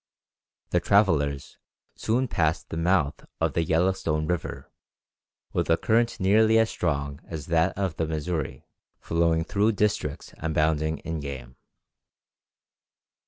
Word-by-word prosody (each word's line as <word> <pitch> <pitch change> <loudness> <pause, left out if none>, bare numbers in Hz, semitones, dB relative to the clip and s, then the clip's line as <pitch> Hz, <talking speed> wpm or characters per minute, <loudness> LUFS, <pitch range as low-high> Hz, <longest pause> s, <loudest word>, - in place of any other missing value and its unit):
The - - +3
travellers 75 -9 +1 0.4
soon 125 +4 0
passed 80 -5 0
the - - -5
mouth 80 -3 +1 0.2
of - - 0
the 85 - +1
Yellowstone 80 -2 +1
River, 90 0 -4 0.8
with - - -1
a 80 - +4
current 115 +1 +1
nearly 110 +4 +4
as 110 0 +3
strong 70 -4 -2
as 80 -4 -6
that 80 +2 +2
of 95 -5 -2
the 80 - -1
Missouri, 80 -1 -3 0.3
flowing 85 0 +1
through 105 +6 +1
districts 100 -9 -1
abounding 80 0 0
in 80 -1 -3
game. 65 -3 -7
80 Hz, 120 wpm, -26 LUFS, 75-95 Hz, 0.8 s, a